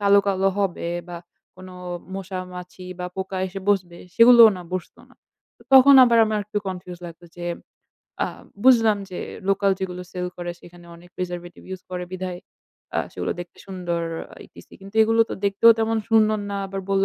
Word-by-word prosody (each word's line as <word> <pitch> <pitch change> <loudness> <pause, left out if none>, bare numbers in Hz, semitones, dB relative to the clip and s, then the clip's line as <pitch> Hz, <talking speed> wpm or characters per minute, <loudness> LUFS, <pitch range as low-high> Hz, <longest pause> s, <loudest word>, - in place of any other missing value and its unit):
কালো, 200 0 +5
কালো 195 -1 +2
হবে 190 -4 -1 0.2
বা 175 - -6 0.4
কোন 185 0 -11 0.5
মশা, 190 -1 -5 0.2
মাছি 180 +1 -10
বা 180 - -3
পোকা 190 0 -4
এসে 190 +1 -7
বসবে, 180 -4 -1 0.2
সেগুলোও 230 -1 +8
না 180 - -8
বসত 185 -2 -5
না। - - -21 0.4
তো - - -19
তখন 270 +1 +9
আবার 235 -2 +3
আমার 215 -1 -1
একটু 210 +1 -3
কনফিউজ 180 -1 -7
লাগতো 170 +1 -12
যে, 175 -1 -4 0.7
"আ - - -2 0.4
বুঝলাম 225 -5 +5
যে 180 - -6 0.3
লোকাল 195 0 +2
যেগুলো 180 -1 -4
সেল 180 -1 -3
করে 175 0 -5
সেখানে 175 0 -15
অনেক 175 +1 -17
preservative 175 -1 -6
use 185 - -13
করে 180 -1 -4
বিধায়, 185 -1 -5 0.6
আ - - +2
সেগুলো - - -3
দেখতে 175 -1 -10
সুন্দর 180 -3 -3 0.3
আ - - -11
ইটিসি। - - -16
কিন্তু 195 +2 -13
এগুলো 225 +1 +2
তো - - -2
দেখতেও 200 +3 +5
তেমন 225 0 +1
সুন্দর 215 -1 +4
না। 200 - -3
আবার 195 0 -5
বলল, 195 0 +3
190 Hz, 180 wpm, -23 LUFS, 180-210 Hz, 0.7 s, তখন